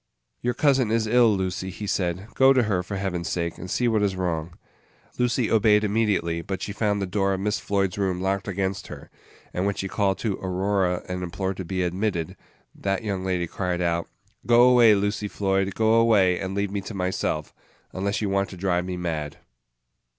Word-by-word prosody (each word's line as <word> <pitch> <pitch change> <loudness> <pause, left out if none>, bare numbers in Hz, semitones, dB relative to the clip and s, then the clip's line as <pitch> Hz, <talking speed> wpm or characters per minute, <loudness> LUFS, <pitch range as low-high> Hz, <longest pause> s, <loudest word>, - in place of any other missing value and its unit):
"Your 120 0 -1
cousin 135 -4 +3
is 115 0 +1
ill, 115 -2 +4
Lucy," 95 0 -3
he 100 +3 -7
said; 90 -1 -1
"go 135 0 +6
to 130 -2 +3
her, 100 -5 0
for 95 +3 -6
Heaven's 95 -3 -2
sake, 85 -1 -2
and 95 - -7
see 125 - +1
what 110 -2 +2
is 100 -2 +1
wrong." 85 -2 -3 0.6
Lucy 125 -1 +1
obeyed 105 -1 +4
immediately; 100 -6 0
but 95 +2 -4
she 100 - -4
found 105 -1 0
the 100 - -1
door 95 +1 0
of - - -5
Miss 105 +2 -1
Floyd's 100 0 -1
room 95 -2 0
locked 95 +1 -1
against 95 0 -2
her; - - -10 0.4
and 90 +2 0
when 100 - -1
she 95 - -3
called 95 -1 0
to 105 -4 -2
Aurora 95 -1 0
and 90 0 -4
implored 95 +1 -3
to 95 - -5
be 95 +1 -1
admitted, 90 -1 -2 0.4
that 95 +2 -2
young 100 -3 -2
lady 90 -2 0
cried 90 +1 -3
out, 85 -1 -1 0.4
"Go 120 0 +6
away, 120 -4 +6
Lucy 105 +1 -1
Floyd; 95 -1 -1
go 110 0 +3
away, 105 -6 +4
and 95 0 -4
leave 100 -1 -1
me 100 -1 -2
to 100 +3 -8
myself, 90 -5 -2 0.4
unless 100 +3 -1
you 100 - 0
want 100 0 +1
to 95 - -10
drive 90 -1 0
me 90 -1 -4
mad!" 80 -4 -3
95 Hz, 200 wpm, -25 LUFS, 90-105 Hz, 0.6 s, go